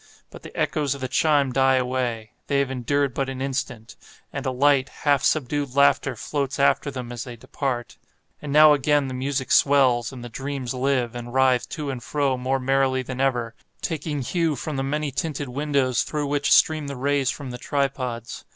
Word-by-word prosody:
But - - -11
the - - -9
echoes 145 -3 0
of 140 - -10
the 130 - -2
chime 145 -1 +2
die 135 0 +4
away—they 125 0 -2
have 140 -1 +1
endured 135 +2 0
but 135 +1 -2
an 130 -1 -5
instant—and 135 +1 -6
a - - +2
light, 135 +1 +3
half 145 -2 +1
subdued 145 -2 0
laughter 140 -2 +3
floats 140 +3 -3
after 140 +1 +3
them 125 -3 -6
as 120 -2 -5
they 120 -2 -8
depart. 120 +1 -4 0.4
And 145 - -5
now 150 +1 +8
again 145 0 +2
the 130 - -5
music 130 +1 -2
swells, 130 -4 +4
and 125 -2 -9
the - - -6
dreams 135 +1 -4
live, 130 -2 0
and 120 0 -7
writhe 130 -2 +3
to 150 -3 -4
and 130 -2 -6
fro 140 0 0
more 130 +1 -1
merrily 130 0 +1
than 130 +1 -5
ever, 120 -4 0 0.3
taking 155 -3 -3
hue 165 +2 0
from 150 +3 -5
the 135 - -1
many 145 +1 -2
tinted 145 -1 -3
windows 140 -2 0
through 150 -1 -2
which 145 0 0
stream 155 -2 +4
the 140 - -5
rays 140 0 +1
from 140 -2 -5
the 125 - -7
tripods. 130 -5 -3
135 Hz, 190 wpm, -24 LUFS, 125-145 Hz, 0.4 s, now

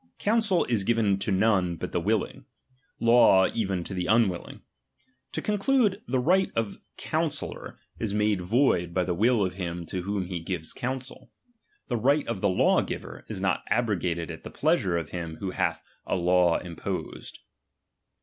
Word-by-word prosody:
Counsel 210 -4 +2
is 115 -5 0
given 105 -3 +2
to 100 - -1
none 95 -3 +2
but 80 - -6
the 90 - -1
willing; 105 +2 -1 0.5
law 115 -5 +6
even 95 -6 -1
to 95 - -6
the 90 -1 -2
unwilling. 110 -5 +1 0.7
To - - -3
conclude, 210 0 +2
the 130 - 0
right 180 +9 +2
of 115 -3 0
the - - -15 0.2
counsel - - -1
lor - - -10 0.2
is 110 -3 -2
made 105 -2 +1
void 90 -4 +1
by 90 - +2
the 90 0 -1
will 110 +3 +3
of 90 - -3
him 85 -2 -5
to 90 +2 -4
whom 100 0 -2
he 90 -1 -4
gives 85 -1 -4
counsel; 130 +1 -5 0.6
the 120 - -1
right 140 +6 +2
of 115 -5 -3
the 100 - +3
law 90 - +3
giver - - -6
is 105 -4 -5
not 95 -1 0
abrogated 90 -7 0
at - - -9
the - - -7
pleasure 85 -2 +1
of 80 -2 -4
him 85 -3 -5
who 95 +2 -4
hath - - -1 0.2
a - - 0
law 90 -1 +3
imposed. 85 -2 -6
100 Hz, 175 wpm, -27 LUFS, 90-115 Hz, 0.7 s, law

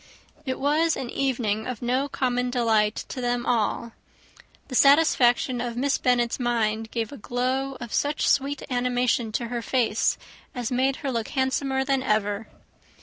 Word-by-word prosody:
It 260 - -2
was 305 +4 +2
an 250 -2 -5
evening 230 -6 -1
of 250 -2 -5
no 260 +4 0
common 250 -2 0
delight 225 -4 +1
to 255 - -5
them 245 0 -1
all; 235 0 0 0.8
the - - -9
satisfaction 255 -3 +4
of 240 -1 -4
Miss 275 +2 +1
Bennet's 240 -1 +1
mind 225 -2 0
gave 225 -2 -2
such 285 - -10
a - - -21
glow 260 +3 -1
of 240 -2 -7
sweet 285 -1 +1
animation 245 -2 +1
to 235 0 -2
her 240 -1 -3
face, 230 -3 +1 0.4
as 245 -2 -3
made 260 +2 +1
her 270 - 0
look 230 -3 -2
handsomer 265 0 0
than 270 -1 +1
ever. 210 -2 0
245 Hz, 155 wpm, -25 LUFS, 235-265 Hz, 0.8 s, satisfaction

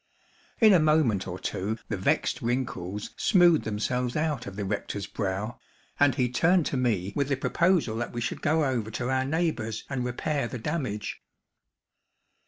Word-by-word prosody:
In 220 -3 +7
a 180 - +6
moment 150 -11 +2
or 90 0 -4
two 105 +4 -3
the 110 - -1
vexed 95 - 0
wrinkles 105 -5 -3
smoothed 175 -5 +4
themselves 120 +4 -1
out 150 -6 -1
of 95 - -7
the 100 0 -3
rector's 100 0 -3
brow, 100 +3 -3 0.4
and 145 -3 +4
he 125 -3 +2
turned 165 +7 +3
to - - -2
me 105 -7 0
with 140 -1 0
the 140 - +1
proposal 170 -5 +2
that 120 - -3
we 120 - -4
should 115 - -3
go 155 0 +2
over 120 -5 -1
to 120 +3 -3
our 130 0 +1
neighbor's 150 -8 -1
and 130 -2 -1
repair 125 +2 -1
the 130 - -5
damage. 125 -5 -3
125 Hz, 170 wpm, -27 LUFS, 105-150 Hz, 0.4 s, In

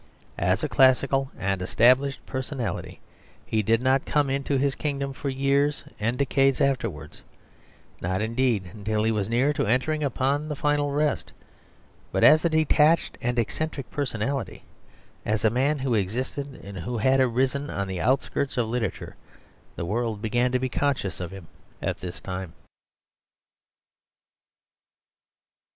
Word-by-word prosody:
As - - +1
a - - +1
classical 135 +1 +3
and 95 -1 -1
established 130 +8 +3
personality 130 -4 -4 0.5
he 110 - 0
did 115 +3 +2
not 130 +1 +3
come 145 -2 +1
into 140 0 0
his 140 +1 +1
kingdom 140 -2 -3
for 140 +1 -4
years 140 +2 +1 0.2
and 115 +4 0
decades 135 0 +2
afterwards; 115 - -1 0.8
not, 95 +2 -1
indeed, 110 -4 0
until 105 0 -1
he 110 - +2
was 105 -2 -1
near 130 +6 +2
to 130 - -1
entering 150 +7 +1
upon 140 +2 0
the 150 - -2
final 145 0 +1
rest. 150 0 -1 0.8
But - - 0
as 155 +1 +7
a 170 - +3
detached 155 0 +3
and 120 +1 -1
eccentric 140 +4 -2
personality, 135 -1 -3 0.6
as 110 +1 0
a 110 - +4
man 135 +5 +1
who 135 -2 -1
existed 125 +7 -2
and 100 -1 -8
who 120 +7 -3
had 130 +4 +3
arisen 130 +3 +1
on 100 -1 -3
the 95 -2 -4
outskirts 135 +1 0
of 120 -2 +1
literature, 115 0 -3 0.6
the - - -4
world 110 +2 -1
began 120 +3 +1
to 130 - +2
be 130 +1 -1
conscious 125 -8 -1
of 90 -2 -4
him 95 -2 -10 0.3
at - - -3
this 90 +1 -7
time. 95 -3 -6
130 Hz, 145 wpm, -25 LUFS, 110-140 Hz, 0.8 s, as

